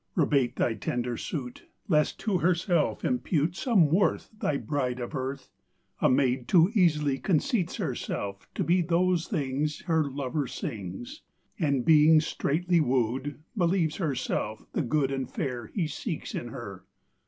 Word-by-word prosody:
Rebate 140 -7 +2
Thy 115 - +1
tender 120 +3 -2
suit, 125 -1 -6 0.2
Lest 150 -5 +2
to 200 -4 +1
herself 170 -1 +1
impute 175 - 0
Some 190 - +3
worth 185 +4 +1
Thy 145 - 0
bride 130 -5 -2
of 120 +4 -5
earth! 135 0 -4 0.5
A - - +4
maid 130 -1 +2
too 175 +2 +5
easily 150 - +2
Conceits 190 - 0
herself 100 -1 -4
to - - 0
be 180 +2 +3
Those 175 0 +1
things 150 - -2
Her 160 -3 +1
lover 140 +1 -2
sings; 125 - -6 0.4
And 140 -7 +1
being 155 0 +7
straitly 170 +3 0
wooed, 130 +2 -1
Believes 175 -4 +1
herself 130 - -2
the - - 0
Good 140 0 +1
And 135 -2 -3
Fair 125 - -4
He 180 - -2
seeks 165 +2 -5
in 120 - -4
her. 105 -7 -8
150 Hz, 140 wpm, -28 LUFS, 130-170 Hz, 0.5 s, being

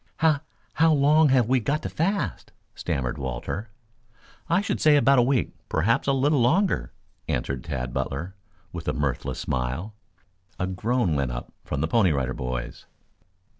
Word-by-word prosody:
"How 155 -2 +3 0.3
how 160 +1 +4
long 150 +2 +5
have 130 -4 +4
we 130 +1 +3
got 145 +6 -1
to - - -3
fast?" 195 +6 -2 0.2
stammered 65 +2 -3
Walter. 65 - -4 0.8
"I 170 +2 +4
should 205 - -2
say 155 -1 +6
about 140 -1 +5
a - - +7
week, 125 0 +1 0.2
perhaps 110 +12 +1
a - - +4
little 135 +1 +2
longer," 180 +11 +2 0.4
answered 65 +1 -2
Tad 65 -6 -4
Butler, 85 +11 -3 0.4
with 85 -2 -7
a - - +1
mirthless 70 0 -2
smile. 65 - -3 0.6
A 90 - -1
groan 95 +1 0
went 70 -3 0
up - - -7
from 70 - -3
the 80 - +1
Pony 95 0 +3
Rider 65 -3 -1
Boys. 65 -1 -5
105 Hz, 160 wpm, -25 LUFS, -, 0.8 s, a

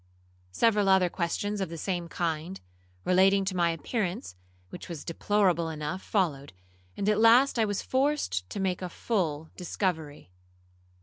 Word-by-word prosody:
Several 210 - +3
other 190 -2 +4
questions 200 +4 -2
of 190 - -2
the 165 - -7
same 175 +1 -3
kind, 170 +2 -3 0.5
relating 195 +2 +4
to 190 -1 -2
my 170 -1 +2
appearance, 170 - -3 0.4
which - - -9
was 165 -4 -7
deplorable 180 -1 +1
enough, 155 +4 -4
followed, 145 - -1 0.4
and 200 - -2
at 210 0 +3
last 235 +3 +5
I 220 - +4
was 205 -1 -2
forced 260 - 0
to - - -5
make 190 -2 -1
a 180 - -4
full 160 -7 -2
discovery. 160 - -3
185 Hz, 145 wpm, -28 LUFS, 165-205 Hz, 0.5 s, last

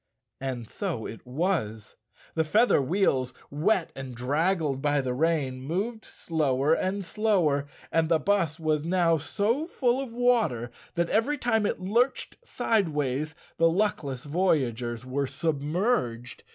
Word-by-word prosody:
And 130 -4 -4
so 170 - -4
it 115 +3 -9
was. 125 - -2 0.4
The 160 - +2
feather 210 +2 +4
wheels, 135 -6 +1 0.2
wet 170 +5 +1
and 130 -2 -7
draggled 145 +3 0
by 145 0 +2
the 130 -2 -1
rain, 140 -3 0
moved 200 - -3
slower 150 -2 0
and 190 +3 -1
slower, 170 -10 +1 0.2
and 160 -1 +2
the 165 - +5
bus 170 -2 0
was 155 -2 0
now 170 -1 +3
so 220 - -1
full 255 -6 +1
of 265 -4 -6
water 225 - +1 0.2
that 170 -1 0
every 275 +7 +2
time 225 -5 +1
it - - -2
lurched 230 +8 0
sideways 155 - 0 0.2
the 165 0 +5
luckless 165 -9 -1
voyagers 125 -8 0
were 135 +2 -1
submerged. 150 - -1
160 Hz, 135 wpm, -27 LUFS, 135-200 Hz, 0.4 s, the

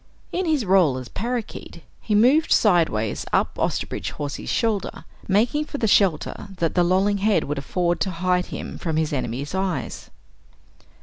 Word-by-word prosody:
In 365 0 -1
his 300 -7 +1
role 180 -8 +4
as 125 -2 -7
parakeet, 235 0 -5 0.2
he 210 - 0
moved 260 +9 +4
sideways 160 - +2
up - - +1
Osterbridge - - -2
Hawsey's 145 -1 -5
shoulder, 225 -4 -1 0.2
making 230 +10 +2
for 290 - -6
the 235 - 0
shelter 195 -1 +2
that 165 -2 0
the 175 - +3
lolling 190 +3 +2
head 210 +1 +2
would 145 0 -3
afford 175 +4 -1
to 195 - 0
hide 180 +1 0
him - - -7
from 160 -3 -2
his 155 -1 0
enemy's 135 +2 -3
eyes. 190 -2 -3
190 Hz, 160 wpm, -23 LUFS, 160-215 Hz, 0.2 s, role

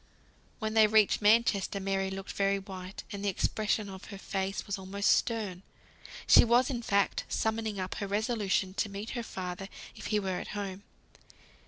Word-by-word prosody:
When 220 0 -3
they 220 -1 +6
reached 215 -1 +4
Manchester, 210 -2 +3
Mary 195 0 -1
looked 195 0 -6
very 200 0 +1
white, 190 -1 -8
and 200 0 -5
the 205 - +2
expression 210 +2 0
on 190 -1 -8
her 200 - -7
face 195 0 -3
was 200 -1 -3
almost 200 +2 +1
stern. 210 -6 0 0.6
She - - +8
was 240 +3 +3
in 240 -3 -2
fact 200 -3 +1
summoning 220 -2 -1
up 185 0 -3
her 200 - -2
resolution 205 -2 0
to 210 +1 -1
meet 200 +3 -6
her 240 - -3
father 185 -3 -6 0.3
if - - -7
he 210 - +2
were 190 -2 -2
at - - -6
home. 195 -1 -4
200 Hz, 175 wpm, -30 LUFS, 195-220 Hz, 0.6 s, She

